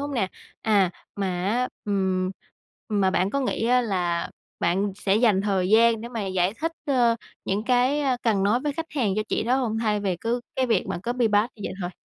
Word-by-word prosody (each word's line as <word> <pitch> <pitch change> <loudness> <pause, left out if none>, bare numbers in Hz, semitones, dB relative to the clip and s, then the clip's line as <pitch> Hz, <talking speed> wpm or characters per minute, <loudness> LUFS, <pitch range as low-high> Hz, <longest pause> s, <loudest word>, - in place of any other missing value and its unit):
hông 285 0 -4
nè? 195 -6 +1 0.3
À, 200 -5 +3 0.3
mà 200 -1 -1 0.2
á, 245 +4 +1 0.2
ừm, 190 -2 0 0.6
mà 200 -3 +2
bạn 185 +2 +1
có 280 - 0
nghĩ 235 -3 -1
á 250 +1 +4
là 180 -6 -1 0.3
bạn 190 +4 +1
sẽ 200 0 +1
dành 215 -5 +4
thời 195 -3 0
gian 225 +1 +5
để 235 - -6
mà 225 -5 -4
giải 185 +2 0
thích, 325 +1 -1
ơ, 240 -4 +3 0.3
những 205 +3 -1
cái, 255 +4 +2
a, 265 -3 +1
cần 210 -5 +2
nói 215 +5 +2
với 295 0 -1
khách 325 +2 -4
hàng 240 -10 0
cho 215 - +1
chị - - 0
đó 245 +3 +2
hông 225 -4 -1
thay 215 -2 0
vì 190 -3 -1
cứ 230 +6 -1 0.2
cái 260 -1 +2
việc 225 -6 +1
mà - - -3
copy 240 -1 +1
paste 210 +3 +2
như 205 - -10
vậy - - -4
thôi? 175 0 -3
215 Hz, 225 wpm, -25 LUFS, 195-245 Hz, 0.6 s, gian